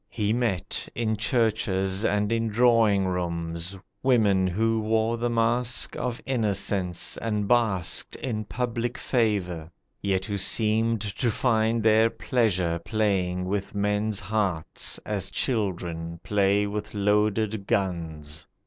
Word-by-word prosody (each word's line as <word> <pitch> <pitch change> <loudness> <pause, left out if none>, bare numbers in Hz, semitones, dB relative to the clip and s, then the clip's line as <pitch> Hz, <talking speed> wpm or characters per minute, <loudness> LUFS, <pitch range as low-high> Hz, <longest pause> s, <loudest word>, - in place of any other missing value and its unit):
He 105 -1 -1
met, 115 -7 -1
in 110 -1 0
churches 105 -4 +1
and 105 -1 +1
in 115 0 +1
drawing 110 -3 +3
rooms, 85 0 -3 0.2
Women 105 -8 +3
who 110 +5 +1
wore 110 +1 +1
the 120 +1 -1
mask 120 +1 +1
of 125 -1 -3
innocence 100 -7 0
And 105 -3 -2
basked 110 -7 +2
in 110 -5 -4
public 120 +1 -3
favour, 95 - -1 0.3
yet 95 -1 0
who 100 0 -3
seemed 110 +3 +2
To 110 +4 -1
find 115 -1 +1
their 110 +1 +5
pleasure 95 -10 0
playing 95 -4 0
with 100 +2 -3
men's 105 0 0
hearts, 95 -5 -1
As 100 -3 -2
children 85 -8 -2
play 100 0 +2
with 105 +1 -5
loaded 105 0 +1
guns. 80 -5 -2
105 Hz, 120 wpm, -26 LUFS, 95-115 Hz, 0.3 s, their